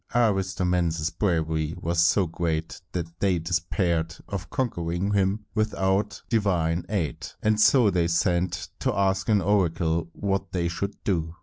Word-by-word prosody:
Aristomenes' 90 -7 +1
bravery 80 -4 0
was 85 0 +1
so 90 +3 +4
great 80 -1 -3
that 85 -2 -5
they 95 -3 +2
despaired 85 -1 -1
of 100 -2 -5
conquering 90 -5 -1
him 100 +2 +1
without 105 -1 0
divine 90 -7 +1
aid, 95 -8 -2 0.2
and 110 0 +3
so 120 -3 +5
they 85 -2 +2
sent 85 0 0
to - - +1
ask 95 +2 +1
an 105 -2 +4
oracle 85 -4 +1
what 100 -1 -2
they 85 -2 0
should 100 +4 -3
do. 85 -4 -1
90 Hz, 135 wpm, -26 LUFS, 85-100 Hz, 0.2 s, so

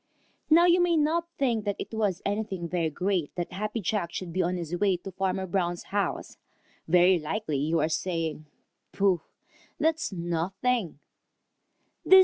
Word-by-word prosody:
Now 335 +2 +7
you 355 0 +5
may 345 -2 +3
not 325 +3 +1
think 235 -6 +1
that 205 -1 0
it - - -7
was 205 -4 0
anything 200 -4 -2
very 170 -2 0
great 180 0 -1
that 175 -1 -3
Happy 210 +4 -3
Jack 190 -3 -1
should 175 -2 -5
be 185 - +1
on 180 +1 0
his 170 0 -3
way 190 0 +2
to 190 +2 -8
Farmer 190 0 -1
Brown's 175 -1 -1
house. 205 -1 -1 0.5
Very 180 +2 +5
likely 155 0 -2
you 160 +4 +1
are - - +2
saying, 160 -2 -2 0.5
"Pooh! 195 -4 +2 0.6
that's 320 -2 +1
nothing!" 180 - -1
190 Hz, 150 wpm, -28 LUFS, 170-215 Hz, 0.6 s, Now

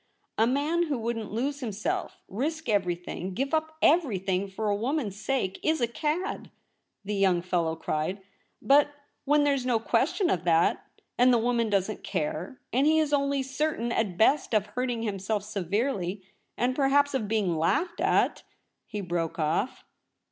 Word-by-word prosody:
* - - -40
A 225 - +5
man 305 +7 +1
who 285 -3 -1
wouldn't 225 -1 -3
lose 275 +6 -2
himself, 215 -5 -3
risk 305 - -3
everything, 180 -2 -1
give 275 - -2
up 315 0 -1
everything, 200 - +2
for 205 +3 -4
a 205 - +2
woman's 235 -1 -2
sake 210 -3 -2
is 315 0 +1
a 240 - +3
cad,' 310 - -2 0.6
the 210 - -2
young 190 -3 +2
fellow 170 -3 0
cried; 160 +4 -2 0.2
* - - -46
but 285 +1 +5 0.4
when 295 +1 +4
there's 280 -3 +2
no 250 -2 +2
question 305 - +1
of 175 - 0
that, 165 -1 +3 0.4
and 250 +1 +6
the 240 - +5
woman 235 -1 +1
doesn't 200 +1 -1
care, 175 +5 -3
and 265 +4 +3
he 315 +1 +4
is 305 -2 +1
only 280 -1 +1
certain 265 -3 -1
at 205 -7 -1
best 240 +2 +3
of 210 -2 +3
hurting 240 +2 -2
himself 205 0 -2
severely, 200 -1 -2 0.3
and 250 +1 +1
perhaps 285 +1 +3
of 225 -6 -1
being 205 -5 +1
laughed 330 - 0
at - - +2 0.2
' - - -47
— - - -54
he 210 -2 -4
broke 170 -3 -2
off. 165 +10 -1
230 Hz, 170 wpm, -27 LUFS, 195-280 Hz, 0.6 s, and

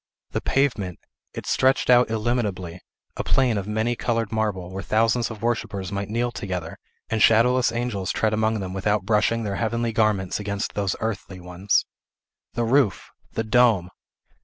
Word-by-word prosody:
The - - -2
pavement! 110 - 0 0.4
it - - -6
stretched 130 +1 +2
out 125 -1 +5
illimitably, 105 -6 -2 0.4
a - - -2
plain 130 -4 +2
of 100 - -6
many 110 +3 0
colored 115 -3 -1
marble, 105 -5 -2
where 95 +1 -5
thousands 115 +3 +1
of 110 -1 -9
worshippers 100 -5 -2
might 100 0 -3
kneel 120 +2 0
together, 90 -7 -5 0.3
and 110 -1 0
shadowless 120 +4 +4
angels 115 -5 -2
tread 110 -1 0
among 110 0 +1
them 95 -1 -5
without 105 +1 0
brushing 115 +2 +2
their 100 -2 -3
heavenly 115 0 -1
garments 105 -5 +1
against 100 -1 -3
those 100 -2 -1
earthly 105 -4 -4
ones. 90 +3 0 0.7
The 120 - -1
roof! 115 -5 +1 0.2
the 115 - -1
dome! 110 -6 +3
110 Hz, 160 wpm, -24 LUFS, 100-115 Hz, 0.7 s, out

